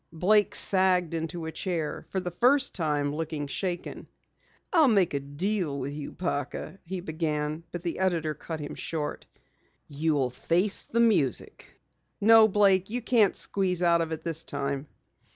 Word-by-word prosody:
Blake 205 +5 +3
sagged 185 -3 +3
into 165 +1 -4
a 160 - -4
chair, 165 -2 -3
for 190 - -1
the 180 -1 -4
first 265 - +3
time 150 -4 -1
looking 155 -1 -3
shaken. 175 +4 -4 0.7
"I'll 320 -5 +6
make 200 - +3
a 140 - 0
deal 150 +3 -2
with 135 +2 -4
you, 145 -1 -6
Parker," 170 +2 -4
he 185 +1 -5
began, 155 -1 -3
but 175 -1 -6
the 170 0 -3
editor 170 -5 0
cut 160 +2 -7
him 145 - -6
short. 150 -3 -5 0.6
"You'll 145 -3 0
face 175 +10 0
the 235 - 0
music! 190 - 0 0.4
No, 220 +1 +7
Blake, 195 -2 +3
you 240 +2 -3
can't 225 -6 +3
squeeze 180 -3 -1
out 170 -1 +4
of 165 -1 -3
it 160 0 -5
this 165 -1 -2
time." 140 -1 -3
170 Hz, 155 wpm, -27 LUFS, 150-190 Hz, 0.7 s, No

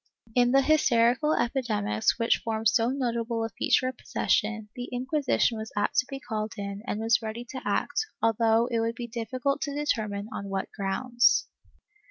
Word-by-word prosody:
^ - - -22
In 245 0 +4
the 275 +1 +5
hysterical 270 -1 +3
epidemics 220 - 0
which 230 -1 +2
form 220 -1 -2
so 230 +1 +3
notable 235 -3 -1
a - - -4
feature 255 +4 +1
of 255 -1 -4
possession, 215 +2 0
the 245 0 -6
Inquisition 255 -2 0
was 220 0 -6
apt 205 - +2
to 255 - 0
be 275 -1 -5
called 215 -4 -4
in 200 0 -5
and 210 - -2
was 225 +1 +2
ready 225 +2 -5
to 260 - -6
act, 440 - -1
although 225 0 +3
it 235 -2 -1
v/ould 230 +1 -1
be 240 - -5
difficult 250 +4 -2
to 285 -1 -3
determine 215 -8 -1
on 200 - -5
what 195 0 -3
grounds. 235 +4 +2
230 Hz, 180 wpm, -27 LUFS, 220-255 Hz, -, the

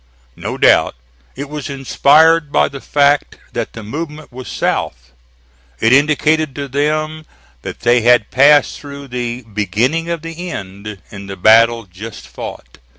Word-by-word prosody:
No - - -5
doubt - - +4 0.4
it 140 +2 -6
was 150 0 -6
inspired 150 +3 +3
by - - +2
the 140 -1 -9
fact 145 0 +1 0.2
that - - -4
the 115 - -9
movement 150 +6 -7
was 130 +1 -9
south. - - -3 0.7
It 115 - +3
indicated 150 +1 +2
to 140 -1 -4
them 155 +3 -1 0.4
that - - -8
they 120 0 +3
had 120 -2 +3
passed 145 +3 +4
through 140 -1 -10
the 125 0 -4
"beginning 110 - -1
of 170 -2 -3
the 165 +2 -6
end" 100 - -7
in 100 -1 -9
the 95 -1 -7
battle 115 +4 +5
just 100 +4 -10
fought. - - -9
140 Hz, 150 wpm, -16 LUFS, 115-150 Hz, 0.7 s, battle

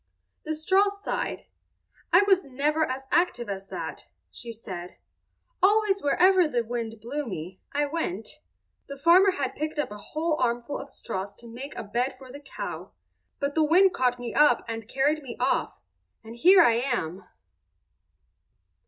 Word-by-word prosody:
The 315 - -2
straw 380 +6 +3
sighed. 400 0 -4 0.7
"I 360 +4 +7
was 385 -2 +4
never 300 +4 0
as 260 +1 -4
active 325 -8 +1
as 195 0 -5
that," - - -6 0.2
she 235 - -8
said. 185 -6 -8 0.6
"Always 405 0 +3
wherever 360 +4 +4
the 245 -5 0
wind 230 -1 -4
blew 270 +6 -4
me 180 -1 -7
I 290 +1 +1
went. 280 - -3 0.6
The 280 - -7
farmer 345 +7 +6
had 285 -8 -2
picked 305 +1 -4
up 295 - -1
a 210 - -8
whole 310 +7 -2
armful 240 +3 -1
of 280 - -9
straws 200 -5 -5
to 235 - -14
make 250 +5 -8
a - - -5
bed 240 +6 -2
for 260 -1 -13
the 285 - -9
cow; 290 - -7 0.5
but 280 0 -1
the 315 - +3
wind 360 +5 +5
caught 250 -1 +1
me 245 -1 -6
up 295 -5 +4
and 225 -1 -5
carried 290 +4 +1
me 255 -4 -8
off—and 225 +1 -4
here 360 +7 +7
I 230 -6 +4
am." 235 -9 -2
275 Hz, 160 wpm, -26 LUFS, 230-320 Hz, 0.7 s, I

